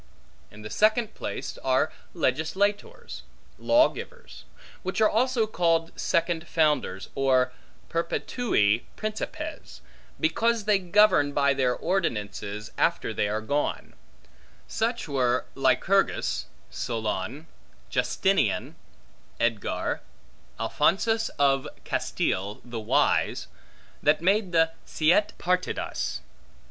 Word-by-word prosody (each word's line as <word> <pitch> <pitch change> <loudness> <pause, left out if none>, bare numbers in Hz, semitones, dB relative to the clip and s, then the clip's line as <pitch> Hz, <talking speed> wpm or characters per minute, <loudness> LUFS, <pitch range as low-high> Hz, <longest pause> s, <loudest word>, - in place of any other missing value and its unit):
In 105 0 -13
the 105 - -7
second 215 +1 +2
place - - -5
are 130 +4 +1 0.2
legislatores, 190 - -1 0.4
lawgivers; 320 +10 0 0.4
which 185 +2 -3
are 215 - +6
also 240 +1 +2
called 165 -5 +1
second 170 0 0
founders, 150 - 0
or 130 -2 +2 0.3
perpetui 165 - +1
principes, 305 +9 -5 0.4
because 235 -8 +1
they 210 -2 +4
govern 180 -6 +4
by 140 -1 +3
their 130 -2 +1
ordinances 105 - -2
after - - +1
they 105 - 0
are 105 +1 -2
gone; 145 +7 -2 0.7
such 235 -2 -1
were 125 -3 +1
Lycurgus, 175 +9 +1 0.2
Solon, 115 +5 -3 0.5
Justinian, - - +1 0.6
Eadgar, 115 -3 -1 0.6
Alphonsus 225 +3 +1
of 135 -1 +2 0.2
Castile, 95 +11 -1
the 120 -1 -5
Wise, 110 - +1 0.5
that 150 +1 +3
made 195 +2 +2
the 165 -1 +3
Siete 175 +7 +2
Partidas. 180 +1 -2
160 Hz, 95 wpm, -26 LUFS, 125-210 Hz, 0.7 s, are